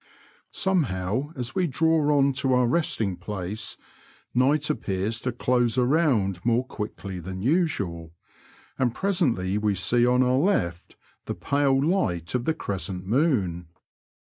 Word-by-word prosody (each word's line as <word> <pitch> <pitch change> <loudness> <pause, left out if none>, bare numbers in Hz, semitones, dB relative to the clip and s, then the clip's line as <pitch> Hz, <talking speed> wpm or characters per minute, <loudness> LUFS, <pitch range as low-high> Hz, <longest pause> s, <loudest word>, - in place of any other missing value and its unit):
Somehow, 130 - 0
as 125 -3 -4
we 185 -2 +1
draw 155 0 +2
on 140 0 +3
to 130 0 0
our 125 0 +3
restng 115 - 0
place, 100 +2 -5 0.6
night 140 +4 +2
appears 110 -5 -2
to 125 - -1
close 120 0 +1
around 125 - +2
more 120 +2 +2
quickly 100 -5 -6
than 95 +2 -6
usual, 105 - 0 0.7
and 125 -2 +1
pre 200 +1 0
sently 110 - 0
we 105 -2 +1
see 120 +6 +2
on 125 +1 +4
our 125 +1 +2
left 90 - -1 0.3
the - - -4
pale 140 -1 +1
light 90 - 0
of 125 -1 -1
the 160 - +1
crescent 95 -1 -4
moon. 100 - +1
120 Hz, 140 wpm, -25 LUFS, 95-145 Hz, 0.7 s, on